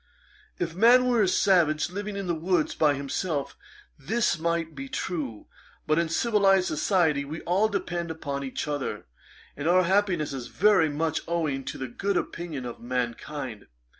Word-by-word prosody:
'If 165 Hz, -2 st, -2 dB
man 240 Hz, +7 st, +6 dB
were 245 Hz, -3 st, +3 dB
a 200 Hz, -, +3 dB
savage, 170 Hz, -4 st, +3 dB
living 205 Hz, +2 st, -4 dB
in 200 Hz, -, -3 dB
the 175 Hz, -, 0 dB
woods 170 Hz, 0 st, 0 dB
by 150 Hz, -2 st, +3 dB
himself, 140 Hz, +2 st, -3 dB, 0.4 s
this 175 Hz, -, 0 dB
might 165 Hz, -1 st, -1 dB
be 135 Hz, -1 st, -7 dB
true; 140 Hz, -, -4 dB, 0.4 s
but 155 Hz, +1 st, +2 dB
in 170 Hz, -1 st, 0 dB
civilized 195 Hz, -1 st, +3 dB
society 155 Hz, -3 st, +1 dB
we 155 Hz, +3 st, -6 dB
all 190 Hz, +5 st, +2 dB
depend 175 Hz, -5 st, -3 dB
upon 140 Hz, -4 st, -4 dB
each 135 Hz, +2 st, -4 dB
other, 145 Hz, -2 st, -3 dB, 0.5 s
and 145 Hz, +2 st, -3 dB
our 185 Hz, +2 st, +5 dB
happiness 185 Hz, -5 st, +1 dB
is 125 Hz, -3 st, -5 dB
very 195 Hz, -4 st, +3 dB
much 155 Hz, +1 st, -1 dB
owing 155 Hz, -5 st, -1 dB
to -, -, -5 dB
the 130 Hz, -, -4 dB
good 195 Hz, +10 st, -1 dB
opinion 160 Hz, -7 st, -4 dB
of 120 Hz, -, -7 dB
mankind. 125 Hz, -1 st, -4 dB
165 Hz, 165 wpm, -27 LUFS, 145-185 Hz, 0.5 s, man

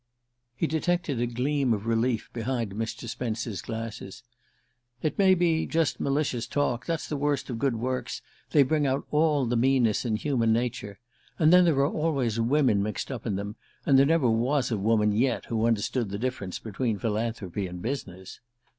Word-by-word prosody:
He -, -, 0 dB
detected 160 Hz, -3 st, 0 dB
a 120 Hz, -, +1 dB
gleam 130 Hz, +2 st, 0 dB
of 105 Hz, +1 st, -7 dB
relief 115 Hz, 0 st, 0 dB
behind 115 Hz, -2 st, -2 dB
Mr. 115 Hz, +2 st, -4 dB
Spence's 115 Hz, -2 st, -3 dB
glasses. 115 Hz, -2 st, -6 dB, 0.8 s
"It 155 Hz, -, -1 dB
may 190 Hz, -1 st, +6 dB
be 170 Hz, -2 st, +1 dB
just 165 Hz, -1 st, 0 dB
malicious 135 Hz, -4 st, -1 dB
talk. 130 Hz, -4 st, -1 dB
That's 165 Hz, -2 st, -2 dB
the 150 Hz, -, -3 dB
worst 140 Hz, -2 st, -1 dB
of 115 Hz, -, -4 dB
good 135 Hz, -1 st, +1 dB
works; 125 Hz, +3 st, -3 dB, 0.3 s
they 145 Hz, -, +5 dB
bring 150 Hz, +1 st, +1 dB
out 135 Hz, +1 st, -1 dB
all 150 Hz, -3 st, +3 dB
the 120 Hz, +1 st, 0 dB
meanness 120 Hz, -3 st, +2 dB
in 115 Hz, -4 st, 0 dB
human 115 Hz, -2 st, +1 dB
nature. 115 Hz, -3 st, -2 dB, 0.4 s
And 160 Hz, 0 st, +5 dB
then 180 Hz, 0 st, +7 dB
there 165 Hz, -4 st, +3 dB
are -, -, +4 dB
always 135 Hz, -8 st, 0 dB
women 120 Hz, -3 st, +3 dB
mixed 105 Hz, +5 st, -3 dB
up 120 Hz, -3 st, -5 dB
in 105 Hz, -, 0 dB
them, 100 Hz, +2 st, -5 dB, 0.3 s
and 135 Hz, -2 st, +5 dB
there 140 Hz, -, +5 dB
never 160 Hz, -4 st, +3 dB
was 125 Hz, +4 st, +1 dB
a 110 Hz, -, +1 dB
woman 105 Hz, 0 st, +2 dB
yet 120 Hz, +6 st, +1 dB
who 115 Hz, 0 st, 0 dB
understood 115 Hz, 0 st, 0 dB
the 100 Hz, -, -4 dB
difference 115 Hz, -6 st, -3 dB
between 110 Hz, 0 st, -2 dB
philanthropy 105 Hz, -4 st, -2 dB
and 90 Hz, 0 st, -7 dB
business." 95 Hz, -6 st, -6 dB
120 Hz, 180 wpm, -27 LUFS, 110-140 Hz, 0.8 s, then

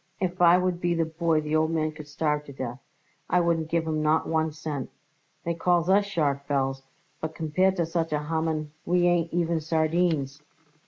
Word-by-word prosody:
If 180 Hz, -1 st, -2 dB
I 175 Hz, 0 st, +7 dB
would 180 Hz, -1 st, -1 dB
be 175 Hz, 0 st, +1 dB
the 165 Hz, -1 st, +1 dB
boy 160 Hz, 0 st, 0 dB
the 150 Hz, +1 st, -2 dB
old 160 Hz, 0 st, +3 dB
man 155 Hz, -1 st, 0 dB
could 155 Hz, -1 st, -11 dB
starve 150 Hz, 0 st, -1 dB
to 140 Hz, -, -10 dB
death; 130 Hz, -2 st, -5 dB, 0.5 s
I 180 Hz, -, +4 dB
wouldn't 165 Hz, -2 st, +1 dB
give 165 Hz, 0 st, 0 dB
him 155 Hz, -1 st, -1 dB
not 155 Hz, +1 st, +2 dB
one 160 Hz, 0 st, +1 dB
cent. 150 Hz, -4 st, -5 dB, 0.5 s
They 170 Hz, -, -1 dB
call 175 Hz, +1 st, +2 dB
us 200 Hz, +1 st, +4 dB
sharks, 140 Hz, -7 st, -1 dB
Belz, 135 Hz, -1 st, 0 dB, 0.4 s
but 160 Hz, 0 st, -5 dB
compared 185 Hz, +5 st, +1 dB
with 170 Hz, -2 st, 0 dB
such 165 Hz, -1 st, -1 dB
a 150 Hz, 0 st, -1 dB
Haman 160 Hz, -1 st, -2 dB
we 175 Hz, 0 st, +2 dB
ain't 175 Hz, -1 st, +2 dB
even 170 Hz, -1 st, 0 dB
sardines." 155 Hz, -2 st, 0 dB
160 Hz, 195 wpm, -26 LUFS, 150-170 Hz, 0.5 s, I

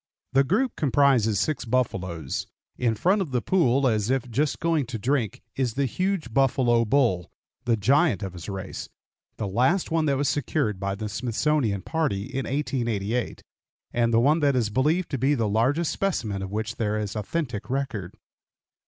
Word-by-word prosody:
The 135 Hz, +1 st, +5 dB
group 225 Hz, -, 0 dB
comprises 135 Hz, -8 st, +3 dB
six 150 Hz, +2 st, -1 dB
buffaloes. 95 Hz, -, -2 dB, 0.3 s
In 120 Hz, -3 st, 0 dB
front 190 Hz, -, +2 dB
of 180 Hz, -, -2 dB
the 125 Hz, -2 st, 0 dB
pool, 135 Hz, -4 st, +2 dB
as 110 Hz, -2 st, +1 dB
if 130 Hz, -2 st, -1 dB
just 140 Hz, +5 st, 0 dB
going 165 Hz, -6 st, +1 dB
to 120 Hz, -2 st, -4 dB
drink, 120 Hz, -1 st, -1 dB
is 125 Hz, -4 st, -1 dB
the 140 Hz, 0 st, +1 dB
huge 185 Hz, -, -2 dB
buffalo 120 Hz, -3 st, +3 dB
bull, 105 Hz, -9 st, +2 dB, 0.4 s
the 115 Hz, -2 st, +2 dB
giant 125 Hz, -, +3 dB
of 95 Hz, -2 st, -5 dB
his 90 Hz, +2 st, -8 dB
race, 95 Hz, -1 st, -6 dB, 0.5 s
the 105 Hz, -, -2 dB
last 130 Hz, -, +1 dB
one 160 Hz, -1 st, +2 dB
that 140 Hz, -1 st, +2 dB
was 140 Hz, +1 st, 0 dB
secured 130 Hz, -8 st, 0 dB
by 100 Hz, 0 st, -2 dB
the 105 Hz, +1 st, -4 dB
Smithsonian 115 Hz, -1 st, 0 dB
party 150 Hz, -12 st, -1 dB
in 135 Hz, -1 st, -4 dB
1888, 120 Hz, -5 st, -2 dB, 0.5 s
and 120 Hz, -1 st, +2 dB
the 115 Hz, -, +4 dB
one 145 Hz, +7 st, +4 dB
that 140 Hz, -3 st, +2 dB
is 115 Hz, -4 st, +1 dB
believed 155 Hz, -, +1 dB
to 135 Hz, -, -1 dB
be 140 Hz, +4 st, +3 dB
the 115 Hz, -4 st, 0 dB
largest 130 Hz, +10 st, +1 dB
specimen 115 Hz, -, -1 dB
of 95 Hz, 0 st, -5 dB
which 110 Hz, +2 st, -3 dB
there 110 Hz, -3 st, 0 dB
is 105 Hz, -1 st, -3 dB
authentic 120 Hz, -1 st, -3 dB
record. 125 Hz, -9 st, -3 dB
125 Hz, 175 wpm, -25 LUFS, 105-145 Hz, 0.5 s, The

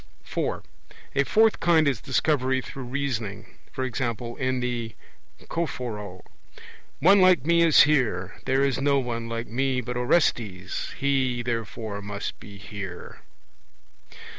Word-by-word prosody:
(4) -, -, -3 dB, 0.5 s
A 140 Hz, -, +3 dB
fourth 220 Hz, +5 st, +4 dB
kind 165 Hz, -3 st, +4 dB
is 130 Hz, -7 st, 0 dB
Discovery 130 Hz, -1 st, +1 dB
through 135 Hz, 0 st, -7 dB
reasoning; 120 Hz, -7 st, -3 dB, 0.3 s
e.g. 130 Hz, 0 st, -2 dB, 0.4 s
in 130 Hz, -1 st, 0 dB
The 120 Hz, -2 st, -3 dB, 0.5 s
Choephoroe: 110 Hz, -, -4 dB, 0.8 s
'One 195 Hz, +5 st, +6 dB
like 185 Hz, -7 st, +5 dB
me 170 Hz, +1 st, +4 dB
is 165 Hz, -3 st, +7 dB
here; 110 Hz, -11 st, +1 dB
there 135 Hz, +1 st, +2 dB
is 135 Hz, -1 st, +1 dB
no 140 Hz, 0 st, +3 dB
one 115 Hz, -3 st, -3 dB
like 115 Hz, 0 st, -3 dB
me 130 Hz, +2 st, 0 dB
but 125 Hz, 0 st, -4 dB
Orestes; 115 Hz, -, 0 dB
he, 130 Hz, -3 st, +1 dB
therefore, 115 Hz, -3 st, -4 dB
must 100 Hz, 0 st, -5 dB
be 100 Hz, -1 st, -11 dB
here.' 100 Hz, -2 st, -8 dB
125 Hz, 125 wpm, -25 LUFS, 110-140 Hz, 0.8 s, is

